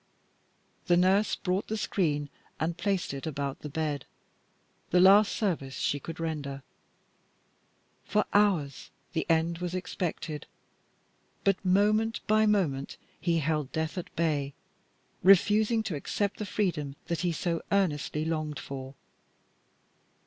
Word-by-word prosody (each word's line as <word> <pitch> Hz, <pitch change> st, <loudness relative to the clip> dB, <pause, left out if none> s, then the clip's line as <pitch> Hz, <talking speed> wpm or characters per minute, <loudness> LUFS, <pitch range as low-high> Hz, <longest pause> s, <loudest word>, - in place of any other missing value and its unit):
The 175 Hz, -1 st, +5 dB
nurse 190 Hz, +4 st, +3 dB
brought 185 Hz, +1 st, -1 dB
the 220 Hz, -, -2 dB
screen 150 Hz, -9 st, 0 dB, 0.3 s
and 165 Hz, +2 st, -1 dB
placed 195 Hz, -4 st, -1 dB
it 140 Hz, +3 st, -5 dB
about 140 Hz, -2 st, -3 dB
the 150 Hz, -, -7 dB
bed 150 Hz, -2 st, -2 dB, 0.8 s
the 180 Hz, -, +4 dB
last 195 Hz, +3 st, +7 dB
service 155 Hz, -, -1 dB
she 145 Hz, -, 0 dB
could 165 Hz, +3 st, -8 dB
render. 145 Hz, -4 st, -4 dB, 1.4 s
For 210 Hz, 0 st, +1 dB
hours 185 Hz, -10 st, +2 dB, 0.2 s
the 160 Hz, -, -1 dB
end 165 Hz, +1 st, +2 dB
was 180 Hz, 0 st, -3 dB
expected, 165 Hz, -4 st, -4 dB, 1.0 s
but 195 Hz, -1 st, +2 dB
moment 210 Hz, +4 st, +2 dB
by 215 Hz, 0 st, +4 dB
moment 155 Hz, -10 st, 0 dB, 0.2 s
he 170 Hz, -2 st, +1 dB
held 150 Hz, -3 st, -1 dB
death 160 Hz, 0 st, -2 dB
at 180 Hz, -, -6 dB
bay, 145 Hz, -4 st, 0 dB, 0.7 s
refusing 210 Hz, +4 st, +5 dB
to 195 Hz, -7 st, -3 dB
accept 200 Hz, +7 st, -2 dB
the 210 Hz, -, -3 dB
freedom 170 Hz, -10 st, -1 dB
that 170 Hz, -2 st, -2 dB
he 180 Hz, -1 st, +1 dB
so 165 Hz, +1 st, -1 dB
earnestly 155 Hz, -5 st, +1 dB
longed 155 Hz, -2 st, -2 dB
for. 135 Hz, 0 st, -7 dB
170 Hz, 125 wpm, -29 LUFS, 150-195 Hz, 1.4 s, last